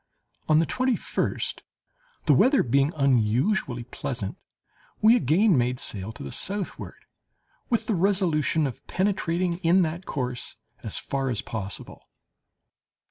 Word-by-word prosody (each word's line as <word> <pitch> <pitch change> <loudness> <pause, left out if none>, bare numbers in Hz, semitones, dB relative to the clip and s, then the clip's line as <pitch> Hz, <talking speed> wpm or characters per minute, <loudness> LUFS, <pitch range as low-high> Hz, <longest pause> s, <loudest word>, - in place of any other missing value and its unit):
On 155 - +6
the 165 - +4
twenty 255 +4 +1
first, - - -2 0.6
the - - +5
weather 275 +2 +5
being 140 +4 +2
unusually 130 - +1
pleasant, 115 -4 -4 0.6
we 225 +2 +6
again 180 - +3
made 125 0 +1
sail 100 +1 -4
to - - -9
the 70 - -6
southward, 195 - -4 0.7
with 235 - +1
the 225 - 0
resolution 170 -5 +2
of 130 - -6
penetrating 180 -2 0
in 180 +1 +4
that 170 +3 -4
course 125 -4 -3 0.3
as - - -6
far 135 -1 -2
as 115 -5 -2
possible. 100 -4 -6
155 Hz, 130 wpm, -26 LUFS, 125-190 Hz, 0.7 s, On